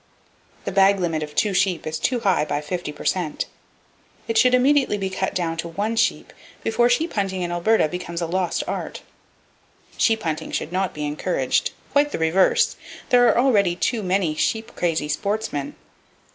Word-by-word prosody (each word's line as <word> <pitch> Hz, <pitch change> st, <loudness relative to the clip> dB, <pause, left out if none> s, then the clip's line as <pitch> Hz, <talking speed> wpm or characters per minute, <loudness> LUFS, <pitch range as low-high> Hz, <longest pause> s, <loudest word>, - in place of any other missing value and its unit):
The -, -, -2 dB
bag 195 Hz, +1 st, +4 dB
limit 165 Hz, -3 st, -1 dB
of 150 Hz, -1 st, -6 dB
two 205 Hz, +3 st, +1 dB
sheep 190 Hz, -2 st, +1 dB
is 155 Hz, 0 st, -3 dB
too 245 Hz, +5 st, 0 dB
high, 195 Hz, -7 st, +2 dB
by 145 Hz, -1 st, -2 dB
50 150 Hz, +1 st, -4 dB
per -, -, -11 dB
cent. 175 Hz, -5 st, -1 dB, 0.8 s
It 230 Hz, -, -2 dB
should 250 Hz, +2 st, +5 dB
immediately 265 Hz, -3 st, +3 dB
be 190 Hz, -1 st, -3 dB
cut 190 Hz, 0 st, -2 dB
down 165 Hz, -2 st, -1 dB
to 165 Hz, -, -3 dB
one 205 Hz, +7 st, -2 dB
sheep, 225 Hz, -, 0 dB, 0.3 s
before 240 Hz, +2 st, +2 dB
sheep 315 Hz, +8 st, +1 dB
hunting 190 Hz, -3 st, -1 dB
in 175 Hz, -, -3 dB
Alberta 175 Hz, +2 st, +2 dB
becomes 170 Hz, 0 st, -5 dB
a 170 Hz, -, -1 dB
lost 180 Hz, +1 st, -1 dB
art. -, -, -5 dB, 0.9 s
Sheep 225 Hz, -1 st, +2 dB
hunting 155 Hz, -2 st, -3 dB
should 160 Hz, -, -3 dB
not 185 Hz, 0 st, -1 dB
be 150 Hz, 0 st, -3 dB
encouraged—quite 175 Hz, -, 0 dB
the -, -, -2 dB
reverse! 195 Hz, -, +2 dB, 0.3 s
There 245 Hz, -1 st, +5 dB
are -, -, +3 dB
already 205 Hz, -9 st, +3 dB
too 225 Hz, +5 st, -1 dB
many 185 Hz, -4 st, 0 dB
sheep 220 Hz, +8 st, -2 dB
crazy 165 Hz, -4 st, 0 dB
sportsmen. 200 Hz, -2 st, -2 dB
190 Hz, 170 wpm, -22 LUFS, 165-225 Hz, 0.9 s, should